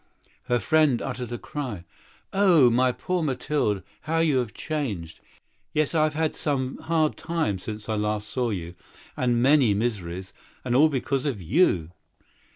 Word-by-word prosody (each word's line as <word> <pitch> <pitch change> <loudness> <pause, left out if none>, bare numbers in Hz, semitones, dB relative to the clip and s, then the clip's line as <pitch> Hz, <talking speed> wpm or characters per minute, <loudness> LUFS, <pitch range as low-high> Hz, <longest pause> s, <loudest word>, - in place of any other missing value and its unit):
Her 120 - +2
friend 145 +2 +3
uttered 125 -2 -5
a 120 - -3
cry. 125 - -5 0.5
"Oh, 175 -11 +5
my 125 +2 +3
poor 180 +8 -2
Mathilde! 135 - -1 0.2
How 160 +1 -1
you 155 -6 +3
are 120 - -3
changed!" 105 - -4 0.5
"Yes, 155 0 +1
I 155 -2 +4
have 155 -1 -2
had 160 -1 +1
a - - -13
pretty 135 -3 -2
hard 160 -2 0
life, 160 - 0
since 105 -1 -7
I 110 - -1
last 105 0 -1
saw 125 0 -1
you, 85 -5 -4 0.4
and 120 -2 +1
great 145 +3 +6 0.3
poverty—and 95 +3 -5
that 155 +4 +6
because 135 0 -1
of 125 -8 -2
you!" 90 - +2
130 Hz, 160 wpm, -25 LUFS, 105-155 Hz, 0.5 s, great